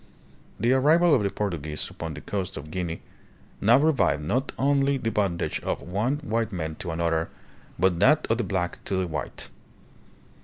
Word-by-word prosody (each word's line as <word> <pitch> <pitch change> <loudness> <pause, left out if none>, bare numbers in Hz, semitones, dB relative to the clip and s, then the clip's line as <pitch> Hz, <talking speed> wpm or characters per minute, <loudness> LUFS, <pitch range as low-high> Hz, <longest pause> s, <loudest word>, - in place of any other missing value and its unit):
The 120 +5 +3
arrival 155 +5 +5
of 135 - +4
the 100 - +1
Portuguese 80 -8 -3
upon 80 -2 -6
the 75 - -8
coast 95 -3 -4
of 75 +2 -8
Guinea 85 -2 -3 0.6
now 115 +4 +6
revived 140 - +2
not 130 - 0
the 140 -3 +1
bondage 95 -5 0
of - - -3
one 105 - -1
white 115 -1 -1
man 80 -4 -3
to 90 - -6
another, 80 0 0 0.5
but 90 -2 +2
that 150 - +5
of 115 - +2
the - - +1
black 95 -3 -2
to 95 - -1
the 95 0 +1
white. 80 -3 -5
100 Hz, 165 wpm, -26 LUFS, 85-130 Hz, 0.6 s, now